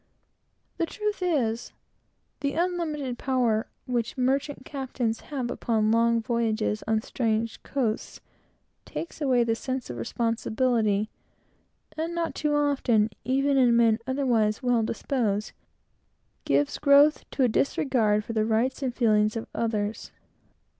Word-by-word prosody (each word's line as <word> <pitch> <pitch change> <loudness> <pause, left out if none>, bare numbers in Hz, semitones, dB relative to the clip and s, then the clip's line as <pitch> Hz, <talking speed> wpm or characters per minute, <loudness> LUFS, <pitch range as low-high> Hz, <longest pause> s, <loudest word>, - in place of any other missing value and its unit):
The 335 - 0
truth 420 +1 -3
is, 245 -10 0 0.7
the 280 -1 -1
unlimited 315 -7 -2
power 245 -4 +1 0.2
which 240 -2 -2
merchant 270 +1 0
captains 255 -5 -3
have, 260 -5 -4
upon 220 -3 +1
long 230 0 +3
voyages 225 -3 0
on 220 0 +1
strange 225 -3 -1
coasts, 235 -6 -2 0.6
takes 330 - -7
away 260 -4 +3
a 230 -1 +1
sense 255 - -4
of 120 - -7
responsibility, 220 - 0 0.8
and 330 +2 -3 0.2
too 300 -1 0
often, 265 -7 +2
even 275 +2 +2
in 245 -3 +5
men 225 -1 +4
otherwise 245 -4 +1
well 245 -2 +3
disposed, 220 -2 -1 1.0
substitutes 290 +1 +4 0.2
a 260 - +5
disregard 225 -4 +1
for 230 - -5
the 220 -1 +1
rights 225 +5 0
and 255 -3 -2
feelings 215 -2 +3
of 225 - -3
others. 220 -2 -2
240 Hz, 120 wpm, -26 LUFS, 220-275 Hz, 1.0 s, in